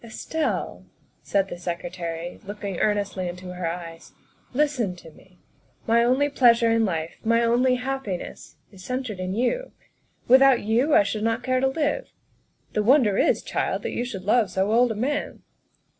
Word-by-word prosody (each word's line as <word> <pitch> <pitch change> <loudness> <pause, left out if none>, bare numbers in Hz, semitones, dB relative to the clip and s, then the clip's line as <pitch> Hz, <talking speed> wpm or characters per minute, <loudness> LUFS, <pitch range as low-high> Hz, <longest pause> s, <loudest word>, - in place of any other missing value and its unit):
" - - -30
Estelle," 300 +7 -3 0.4
said 195 -1 0
the 175 - -8
Secretary, 170 -1 -5
looking 200 -2 -6
earnestly 200 -3 0
into 180 +1 -7
her 180 -1 -3
eyes, 165 -1 -7 0.2
" - - -37
listen 250 -11 0
to 165 -2 -14
me. 180 +3 -21 0.5
My 230 +1 +3
only 260 +4 +3
pleasure 235 -4 +4
in 225 0 +3
life, 165 -4 -3
my 230 +1 +3
only 245 +2 +3
happiness, 250 -7 -5 0.2
is 190 -3 -14
centred 250 -2 -4
in 185 +1 -3
you; 375 - -1 0.5
without 265 0 +6
you 240 +8 +2
I - - +6
should 210 +2 -3
not 225 +1 0
care 255 0 +1
to 265 - +2
live. 300 - -1 0.6
The 215 - +1
wonder 225 -3 +4
is, - - +2
child, - - -2
that - - -3
you 240 - -1
should 210 -7 -6
love 215 +1 +2
so 190 +3 0
old 240 +1 +4
a - - -3
man." 285 +7 -3
225 Hz, 175 wpm, -24 LUFS, 185-255 Hz, 0.6 s, without